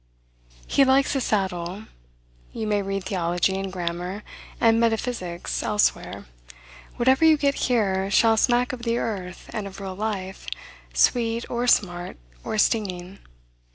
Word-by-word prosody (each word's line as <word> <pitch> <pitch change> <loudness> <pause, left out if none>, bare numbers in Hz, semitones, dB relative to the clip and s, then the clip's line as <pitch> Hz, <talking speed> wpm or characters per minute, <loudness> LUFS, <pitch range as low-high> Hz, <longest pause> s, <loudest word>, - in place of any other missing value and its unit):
He 275 - +4
likes 270 +1 +3
his 270 -3 0
saddle. 190 -1 -1 0.7
You 220 - -3
may 210 -1 +1
read 195 0 -3
theology, 180 0 0
and 195 -1 -4
grammar, 180 +3 -4 0.4
and 225 0 +4
metaphysics 225 -6 -1
elsewhere. 210 -1 0 0.7
Whatever 260 +5 +3
you 320 -1 +7
get 280 -1 +2 0.2
here, 195 -5 +1
shall 225 +3 +4
smack 245 +2 +2
of 250 - -6
the 235 0 0
earth 185 -6 -4
and 210 -2 -3
of 195 0 -10
real 195 -1 -5
life, 195 - -4 0.4
sweet, 230 - +2
or 240 +1 -1
smart, 175 -6 +1 0.3
or - - -3
stinging. 195 -3 0
205 Hz, 135 wpm, -24 LUFS, 185-235 Hz, 0.7 s, you